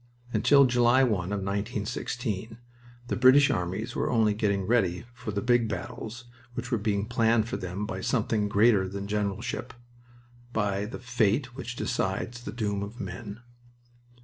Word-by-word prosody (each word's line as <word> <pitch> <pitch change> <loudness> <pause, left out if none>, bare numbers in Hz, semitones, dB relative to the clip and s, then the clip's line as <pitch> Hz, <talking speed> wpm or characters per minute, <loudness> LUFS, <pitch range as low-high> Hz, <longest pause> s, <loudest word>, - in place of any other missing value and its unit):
Until 140 +6 +6
July 120 +1 +4
1 105 -8 +1
of 100 +1 -3
1916 105 +1 -3 0.5
the - - -1
British 130 +3 +6
armies 90 +1 -2
were - - 0
only 110 -3 +3
getting 100 -2 0
ready 95 -4 +1
for 125 -1 -8
the 100 -1 -2
big 120 -1 +3
battles 120 0 -6 0.3
which 125 +3 -5
were 120 - +1
being 100 -1 0
planned 115 -1 +2
for - - -3
them 95 +1 -4
by - - -5
something 105 -2 0
greater 105 -2 +4
than 100 +1 -5
generalship 105 +4 -3 0.8
by 100 -2 0
the 105 - -6
fate 120 +1 0
which 120 -2 -6
decides 120 +1 -2
the - - -6
doom 105 -4 -2
of 105 +4 -7
men. 100 +4 -6
110 Hz, 150 wpm, -28 LUFS, 100-120 Hz, 0.8 s, Until